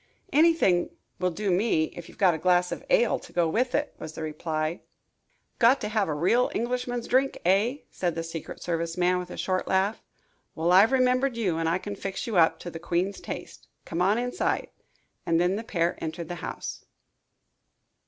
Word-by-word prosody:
"Anything 305 - +4 0.3
will 180 0 +1
do 200 +3 -2
me, 180 -3 +2
if 175 - -9
you've - - -16
got 185 -3 +4
a 160 - -4
glass 180 +1 +3
of - - -5
ale - - +3
to - - -14
go 170 -2 +2
with 245 +10 0
it," 295 0 -1
was 155 - -7
the 160 - -6
reply. 155 +1 -3 0.8
"Got 245 +4 +5
to - - -2
have 215 -2 +1
a 155 - -1
real 185 +11 +2
Englishman's 245 0 -2
drink, 265 +2 +2
eh?" 210 +10 +2
said 175 -3 -2
the 165 - -2
secret 165 -1 -7
service 165 0 -2
man, 180 0 +2
with 180 0 -6
a - - -8
short 185 -1 -1
laugh. 195 +3 +1 0.5
"Well, 165 +2 +1
I've 195 +6 +7
remembered 255 -1 +2
you 185 -8 0
and 165 0 +1
I 170 - +2
can 205 +2 -6
fix 195 -1 -4
you 230 - -3
up 165 -2 +5
to 175 - -6
the 165 - -7
queen's 175 +3 -1
taste. - - -8 0.2
Come 170 +1 -3
on 200 +4 +3
inside." 245 +1 -1 0.5
And 165 0 +2
then 180 +2 +2
the 220 - -4
pair 175 -7 0
entered 160 +1 -5
the 175 - -3
house. - - -6
185 Hz, 195 wpm, -27 LUFS, 170-235 Hz, 0.8 s, I've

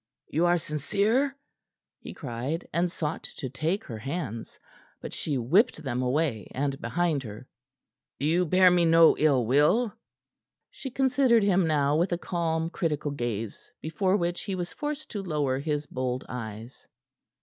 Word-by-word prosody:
"You 165 +4 +2
are 175 0 +4
sincere?" 210 - 0 0.6
he - - -9
cried, 135 +4 -4
and 175 +1 +1
sought 155 -2 -3 0.2
to 130 - -5
take 160 +9 -1
her 115 -4 -7
hands; 130 - -5 0.4
but - - -7
she 145 -4 -2
whipped 160 - +2
them 125 -2 -2
away 130 -3 0
and 140 +1 -2
behind 170 -4 0
her. 110 +1 -9 0.7
"You 165 +5 +1
bear 185 +2 +6
me 175 -1 +4
no 165 0 +6
ill 140 -6 +3
will?" 150 - +3 0.8
She 270 - -7
considered 255 -3 +3
him 190 -3 +3
now 145 -2 +2
with 175 +3 +1
a 175 - +1
calm, 165 -2 -1
critical 150 -5 -1
gaze, 115 -6 -4
before 185 +5 0
which 175 -2 -1
he 195 -3 -3
was 175 -2 -4
forced 300 - -5
to 205 - -3
lower 145 -7 -1
his 150 0 -2
bold 130 -2 -3
eyes. 115 0 -8
160 Hz, 150 wpm, -27 LUFS, 135-180 Hz, 0.8 s, bear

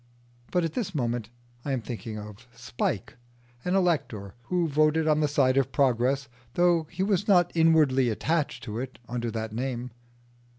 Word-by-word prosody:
But 180 -1 +1
at 165 -2 -2
this 195 -7 -3
moment 120 -5 -1 0.3
I 140 - -2
am 130 - -1
thinking 115 -2 -6
of 105 +3 -10
Spike, 120 -3 -3 0.5
an 180 +1 0
elector 145 - 0
who 175 +4 +1
voted 155 +1 +2
on 155 -1 +3
the 150 - +3
side 135 -2 +2
of 135 - +2
Progress 135 0 +2 0.3
though 175 -2 +3
he 190 - -2
was 200 0 +1
not 175 -4 +5
inwardly 155 -6 +4
attached 155 +7 -1
to 110 -1 -4
it 130 0 -6
under 120 -1 -2
that 110 -1 -4
name. 125 0 -3
135 Hz, 165 wpm, -27 LUFS, 120-165 Hz, 0.5 s, not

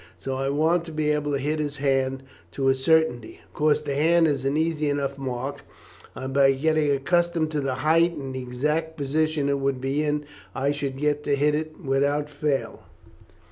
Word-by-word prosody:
So 135 - -4
I 135 +1 -1
want 160 +4 +2
to 165 - -8
be 155 -1 0
able 150 -1 -1
to 140 - +1
hit 150 +3 -1
his 145 -1 -2
hand 135 -1 0 0.3
to 135 +4 +1
a - - +5
certainty. 130 -4 +1
Of - - -30
course 150 0 +2
the 145 -2 -3
hand 165 +4 +4
is 140 -4 -1
an 140 +2 +1
easy 155 -2 0
enough 140 -1 -1
mark, 135 +1 -4 0.5
and 130 0 -5
by 135 0 +5
getting 155 +2 +1
accustomed 165 +3 +1
to 150 -2 -1
the 135 -2 -1
height 165 +2 +4
and 135 -2 -6
the 130 - -4
exact 150 +6 -2
position 150 +1 0
it 140 0 +1
would 135 -1 -1
be 135 +3 -1
in, 150 0 -1 0.3
I 135 +1 +1
should 140 -2 -3
get 150 +1 0
to 145 - +2
hit 145 +2 +2
it 155 +1 -3
without 140 +2 0
fail." 145 -1 -2
145 Hz, 200 wpm, -25 LUFS, 135-155 Hz, 0.5 s, a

